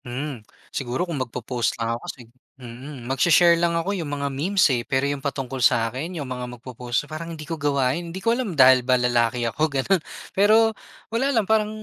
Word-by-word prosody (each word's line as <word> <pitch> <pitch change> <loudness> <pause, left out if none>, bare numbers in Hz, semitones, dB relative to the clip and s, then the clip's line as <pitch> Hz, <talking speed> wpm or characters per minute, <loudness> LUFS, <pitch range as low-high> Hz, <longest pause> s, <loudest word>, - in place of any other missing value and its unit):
Mm, 130 0 -5 0.3
siguro 130 +6 -2
kung 165 -7 -4
mag-popost 125 -1 -2
lang 115 0 -1
ako 115 - -5
kasi - - -7 0.4
mm, 125 +1 -10
magshe-share 170 +6 +5
lang 170 -1 +2
ako 185 +5 -1
yung 170 -7 -4
mga 140 -1 -3
memes 185 +8 +2
eh 120 - 0
pero 130 +3 -1
yung 140 -1 -2
patungkol 135 -2 -4
sa 115 -1 +3
akin 165 +7 -5
yung 145 - -4
mga 125 -1 -5
mag-popost 125 +2 -3
parang 155 +2 -7
hindi 155 - -8
ko 165 - -5
gawain 145 +2 0
hindi 170 - -7
ko 230 +5 +1
alam 235 -9 -3
dahil 130 -1 +7
ba 125 +1 +2
lalaki 120 0 +1
ako 115 +5 -4
ganon 150 +6 +1 0.3
pero 220 +3 +4 0.4
wala 260 +4 +1
lang 230 -7 +2
parang 215 0 +2
140 Hz, 200 wpm, -23 LUFS, 125-170 Hz, 0.4 s, dahil